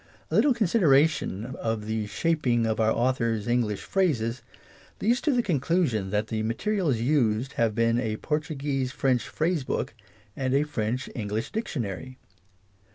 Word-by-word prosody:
A -, -, 0 dB
little 280 Hz, -4 st, +4 dB
consideration 160 Hz, -, +3 dB
of 115 Hz, -2 st, -2 dB
the 110 Hz, -1 st, -2 dB
shaping 125 Hz, -1 st, +1 dB
of 110 Hz, 0 st, -1 dB
our 110 Hz, 0 st, +3 dB
author's 115 Hz, -3 st, 0 dB
English 120 Hz, -4 st, 0 dB
phrases 130 Hz, -11 st, 0 dB, 0.6 s
leads 240 Hz, +5 st, +2 dB
to 305 Hz, -, +2 dB
the 245 Hz, -3 st, +2 dB
conclu 170 Hz, -, +1 dB
sion 105 Hz, -6 st, -2 dB
that 105 Hz, +2 st, -1 dB
the 110 Hz, -1 st, -1 dB
materials 150 Hz, -, 0 dB
used 120 Hz, -1 st, +1 dB
have 115 Hz, -2 st, +1 dB
been 115 Hz, +1 st, +2 dB
a 110 Hz, -3 st, -2 dB
Portu 150 Hz, +1 st, -2 dB
guese 135 Hz, -2 st, -1 dB
French 130 Hz, -3 st, 0 dB
phrase 160 Hz, -2 st, 0 dB
book -, -, -2 dB, 0.4 s
and 130 Hz, -1 st, 0 dB
a 140 Hz, -, +4 dB
French 125 Hz, -4 st, -2 dB
Eng 110 Hz, -4 st, -3 dB
lish 110 Hz, +3 st, -3 dB
dictionary. 130 Hz, -, -4 dB
125 Hz, 160 wpm, -27 LUFS, 110-155 Hz, 0.6 s, little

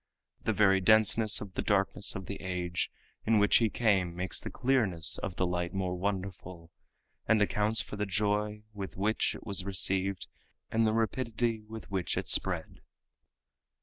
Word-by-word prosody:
The -, -, +2 dB
very 95 Hz, -2 st, +4 dB
denseness 110 Hz, +1 st, +4 dB
of 100 Hz, -3 st, -8 dB
the -, -, -2 dB
darkness 100 Hz, 0 st, +1 dB
of 95 Hz, -, -5 dB
the 100 Hz, -, -6 dB
age 90 Hz, -2 st, -2 dB, 0.3 s
in 110 Hz, 0 st, +3 dB
which 105 Hz, 0 st, +5 dB
he 115 Hz, -2 st, +2 dB
came 95 Hz, -8 st, +1 dB
makes 90 Hz, 0 st, -2 dB
the -, -, -6 dB
clearness 110 Hz, -, +1 dB
of 95 Hz, -, -4 dB
the 95 Hz, -, +1 dB
light 90 Hz, 0 st, -2 dB
more 90 Hz, -2 st, -1 dB
wonderful, 90 Hz, -3 st, -4 dB, 0.6 s
and 110 Hz, 0 st, +4 dB
accounts 105 Hz, +1 st, +2 dB
for 105 Hz, -, -7 dB
the 105 Hz, 0 st, -1 dB
joy 105 Hz, +2 st, -1 dB
with 100 Hz, -3 st, -7 dB
which 105 Hz, +3 st, 0 dB
it -, -, -11 dB
was 100 Hz, -2 st, -1 dB
received 95 Hz, 0 st, 0 dB, 0.5 s
and 115 Hz, 0 st, +3 dB
the 110 Hz, -, +1 dB
rapidity 115 Hz, 0 st, -1 dB
with 110 Hz, -2 st, -9 dB
which 95 Hz, -3 st, -1 dB
it -, -, -2 dB
spread. -, -, -1 dB
100 Hz, 165 wpm, -30 LUFS, 95-110 Hz, 0.6 s, which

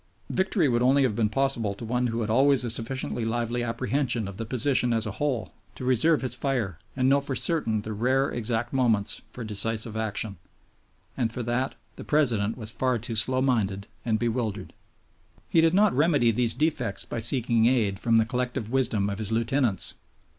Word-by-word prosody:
Victory 190 Hz, -3 st, +1 dB
would 120 Hz, -2 st, +1 dB
only 135 Hz, +3 st, +4 dB
have 120 Hz, -6 st, 0 dB
been 110 Hz, -1 st, +1 dB
possible 115 Hz, -4 st, 0 dB
to 115 Hz, -, -8 dB
one 125 Hz, +2 st, 0 dB
who 115 Hz, 0 st, -2 dB
had 110 Hz, -, -3 dB
always 135 Hz, +2 st, +4 dB
a 120 Hz, -, -1 dB
sufficiently 120 Hz, +1 st, -3 dB
lively 120 Hz, +1 st, -1 dB
apprehension 120 Hz, -1 st, -1 dB
of 100 Hz, -1 st, -8 dB
the 115 Hz, 0 st, -5 dB
position 125 Hz, 0 st, +1 dB
as 115 Hz, 0 st, +1 dB
a 110 Hz, -, -3 dB
whole 130 Hz, -9 st, -1 dB, 0.2 s
to 130 Hz, -, -7 dB
reserve 130 Hz, +6 st, +3 dB
his 130 Hz, -, +1 dB
fire 115 Hz, -, -2 dB, 0.2 s
and 130 Hz, -1 st, +1 dB
know 140 Hz, +1 st, +4 dB
for 140 Hz, -1 st, -3 dB
certain 115 Hz, -12 st, +3 dB
the 110 Hz, -, -5 dB
rare 130 Hz, +6 st, +1 dB
exact 120 Hz, +1 st, -2 dB
moments 115 Hz, -6 st, +1 dB
for 125 Hz, -, -7 dB
decisive 110 Hz, +1 st, -2 dB
action. 110 Hz, -3 st, -3 dB, 0.8 s
And 120 Hz, -4 st, -1 dB
for 120 Hz, +1 st, -4 dB
that 120 Hz, +3 st, -2 dB, 0.2 s
the -, -, -8 dB
President 115 Hz, -8 st, +1 dB
was 110 Hz, -2 st, -3 dB
far 125 Hz, +1 st, 0 dB
too 115 Hz, +1 st, -4 dB
slow 130 Hz, +4 st, +2 dB
minded 100 Hz, -7 st, 0 dB, 0.2 s
and 110 Hz, -2 st, 0 dB
bewildered. 115 Hz, -2 st, -3 dB, 0.7 s
He 165 Hz, -, +3 dB
did 165 Hz, +2 st, +3 dB
not 205 Hz, 0 st, +4 dB
remedy 145 Hz, -4 st, +3 dB
these 115 Hz, 0 st, +2 dB
defects 130 Hz, -7 st, -1 dB
by 120 Hz, -, -5 dB
seeking 115 Hz, -1 st, +2 dB
aid 110 Hz, -6 st, +1 dB
from 115 Hz, 0 st, +2 dB
the 110 Hz, -, +3 dB
collective 125 Hz, -2 st, -3 dB
wisdom 120 Hz, -6 st, +1 dB
of 100 Hz, 0 st, -4 dB
his 110 Hz, -1 st, 0 dB
lieutenants. 115 Hz, -, +2 dB
120 Hz, 190 wpm, -26 LUFS, 110-130 Hz, 0.8 s, only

